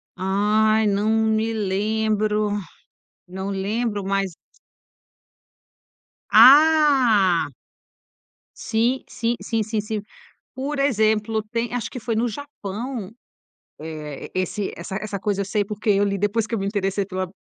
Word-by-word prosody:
Ai, 210 +3 +2
não 205 +1 +1
me 220 0 +1
lembro, 215 +1 0 0.8
não 190 +2 -5
lembro, 205 +2 -2
mas 195 0 -1 2.0
Ah. 265 - +6 1.1
Sim, 235 +4 0
sim, 235 +1 -2
sim, 225 -2 -1
sim, 215 0 -2
sim. 215 0 -4 0.5
Por 275 +2 -4
exemplo, 220 -4 +1
tem 235 0 -2
acho 245 -3 -2
que 250 - -7
foi 230 0 -2
no 230 +2 +1
Japão, 230 -3 -6 0.7
eh, 155 -2 -7
e - - +1
esse 195 +2 -3
essa 170 +3 -7
essa 205 -2 -4
coisa 200 0 -1
eu - - -2
sei, 205 +1 0
porque 210 +2 -4
eu 200 0 +4
li, 200 -1 0
depois 205 +3 0
que 230 - -2
eu - - -2
me 195 - -2
interessei 200 -1 -1
pela 185 -1 -3
215 Hz, 130 wpm, -22 LUFS, 195-230 Hz, 2.0 s, Ah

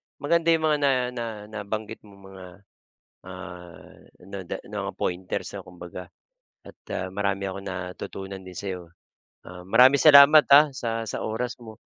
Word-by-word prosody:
maganda 165 +4 0
'yong 165 -1 +3
mga 155 -1 +2
na 140 -1 +3 0.2
na 120 -2 -5 0.3
nabanggit 110 +1 -5
mong 100 -1 -17
mga, 95 -1 -11 0.8
ah, 90 -2 -11 0.3
nada 95 -2 -6
mga - - -5
pointers, 90 +1 -4
ah, - - -6
kumbaga 90 0 -10 0.6
at, - - -12 0.2
ah, 95 0 -4
marami 100 -1 -1
akong 95 0 -5
natutunan 95 +1 -7
din 95 -1 -11
sa'yo. 90 -4 -6 0.6
Ah, 90 0 -11
maraming 130 +6 +6
salamat, 150 0 +8
ah, 145 +1 +7
sa 115 -3 -3
sa - - -5
oras 120 +3 -4
mo. 110 -2 -11
100 Hz, 145 wpm, -25 LUFS, 95-125 Hz, 0.8 s, salamat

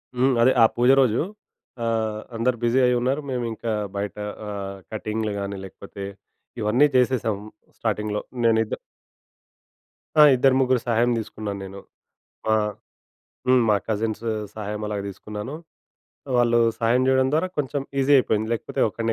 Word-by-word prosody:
హ్మ్. 130 +2 +3
అదే 125 +2 +6
ఆ - - +9
పూజ 120 +1 +3
రోజు. 120 -4 +2 0.6
ఆహ్, 110 -2 -1
అందరూ 120 +2 +1
బిజీ 120 +2 +3
అయ్యున్నారు. 125 +3 +1
మేము 125 -1 -1
ఇంకా 115 +1 -4 0.3
బయట 100 0 -3 0.3
ఆహ్, 100 -1 -5 0.2
కటింగులు 110 0 -2
గాని 100 0 -4
లేకపోతే, 100 +1 -9 0.6
ఇవన్నీ 120 +8 +4
చేసేసాం 125 -4 +2 0.4
స్టార్టింగ్‌లో 105 -1 -1 0.2
నేను 115 -1 +4
ఇద్ద - - -4 1.4
ఆ! - - +11
ఇద్దరు 130 +1 +4
ముగ్గురు 130 -2 +2
సహాయం 120 +1 +2
తీసుకున్నాన 105 -2 -5
నేను. 95 +1 -9 0.7
ఆహ్, 105 -1 +1 0.8
హ్మ్. 130 -1 +5
మా 105 - +5
కజిన్సు 110 +1 -1 0.2
సహాయం 105 0 -5
అలాగా 100 -2 -3
తీసుకున్నాను. 105 +6 -7 0.8
వాళ్ళు 120 -1 +4 0.2
సహాయం 120 +2 +2
చేయడం 130 0 +3
ద్వారా 165 +4 +1
కొంచెం 140 0 -1 0.2
ఈజీ 135 +2 +3
అయిపోయింది 110 -3 0
లేకపోతే 115 - -4
ఒకడిని 115 +1 -2
115 Hz, 135 wpm, -24 LUFS, 105-125 Hz, 1.4 s, ఆ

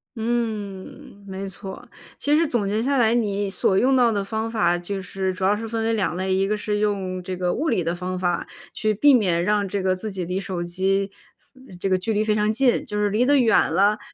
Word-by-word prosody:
嗯， 215 -4 -4
没 190 0 -5
错。 190 0 -6 0.3
其 290 +1 +1
实 325 +1 +3
总 235 -7 0
结 210 +2 0
下 275 +3 +1
来， 230 -2 +4
你 205 -4 0
所 190 0 +1
用 265 +5 +3
到 245 -2 +4
的 200 -2 -1
方 220 +2 -3
法， 175 -6 +1
就 190 +3 -5
是 190 0 -3
主 185 +1 -6
要 195 +2 +3
是 225 +2 -5
分 225 0 -2
为 225 0 +1
2 205 -5 0
类， 190 0 -1
一 195 +1 +1
个 210 +1 0
是 210 0 -2
用 195 -3 -1
这 185 0 -5
个 180 -1 0
物 320 - -1
理 200 -7 +1
的 170 +1 -1
方 180 +1 -4
法， 175 -1 -1 0.3
去 215 0 0
避 285 +8 +5
免 180 -8 +2
让 205 +1 +1
这 195 0 -3
个 185 0 +2
自 210 +3 -6
己 185 -2 -4
离 180 +2 -2
手 185 -3 -4
机 190 +3 0 0.7
这 195 - -1
个 185 - +3
距 185 +5 -3
离 215 0 +1
非 215 -1 +1
常 210 0 +2
近。 245 +2 +2
就 210 -2 -4
是 210 0 +1
离 215 +4 +2
得 285 +2 +4
远 230 -9 +3
了， 200 +5 +3
205 Hz, 250 characters per minute, -23 LUFS, 185-220 Hz, 0.7 s, 避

